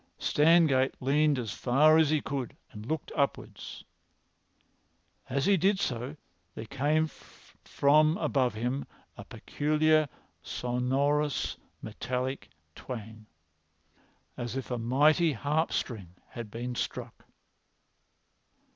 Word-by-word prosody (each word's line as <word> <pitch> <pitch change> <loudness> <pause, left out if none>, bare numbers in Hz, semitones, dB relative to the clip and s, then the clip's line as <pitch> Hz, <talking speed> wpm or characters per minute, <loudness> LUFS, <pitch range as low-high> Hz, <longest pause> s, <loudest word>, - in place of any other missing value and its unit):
Stangate 150 -4 +3
leaned 145 +2 +2
as 115 -4 -3
far 145 +5 +4
as 155 -2 +4
he 155 -1 +2
could 135 -4 -4
and 105 +1 -10
looked 160 0 -3
upwards. 140 -2 -3 1.5
As 135 +1 0
he 200 0 +4
did 190 +3 +2
so 130 -3 -3 0.4
there 110 - -6
came 145 +6 +1
from 155 0 0
above 135 -7 0
him 125 +5 -2 0.3
a - - -9
peculiar 155 0 +1 0.3
sonorous 135 +4 -1 0.3
metallic 125 +4 -4 0.2
twang, 110 -1 -8 1.1
as 120 +1 -4
if 135 -1 -5
a 120 - -1
mighty 150 +7 +3
harp 150 +6 0
string 95 -8 -4
had 115 -3 -7
been 120 +3 -5
struck. - - -5
135 Hz, 105 wpm, -29 LUFS, 125-155 Hz, 1.5 s, far